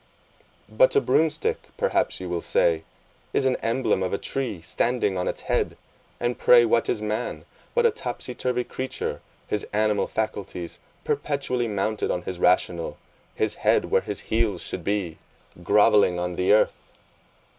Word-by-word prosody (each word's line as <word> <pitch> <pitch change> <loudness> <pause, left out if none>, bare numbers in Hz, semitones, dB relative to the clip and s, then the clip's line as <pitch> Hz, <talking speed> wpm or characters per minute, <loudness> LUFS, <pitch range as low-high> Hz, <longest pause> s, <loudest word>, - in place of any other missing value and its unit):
But - - +3
a - - +7
broom 160 - +3
stick, - - -2 0.2
perhaps - - +1
you 90 - -5
will 85 -1 -2
say, 80 -1 +2 0.5
is 135 - +2
an 130 -1 +3
emblem 115 -4 0
of 90 - -1
a - - +1
tree 125 -7 -3
standing 105 +5 0
on 90 - -1
its - - -3
head; - - -1 0.4
and 120 0 -1
pray 120 -1 +7
what 115 0 +2
is 110 - -1
man, 105 0 -3 0.3
but 480 -1 +3
a 465 - +5
topsy 270 - -5
turvy 125 0 -1
creature, 130 +2 -4 0.3
his 105 - -1
animal 105 0 +1
faculties 100 -5 -4 0.2
perpetually 130 -4 -1
mounted 105 +1 -1
on 90 - -1
his 90 -2 -5
rational, 90 -1 +1 0.4
his - - 0
head - - +2
where - - +4
his - - -5
heels 110 -5 0
should 90 - -5
be, 95 -4 -2 0.4
grovelling 100 -1 +4
on 90 0 -2
the 90 +2 +2
earth! 105 - +2
105 Hz, 160 wpm, -25 LUFS, 90-125 Hz, 0.5 s, a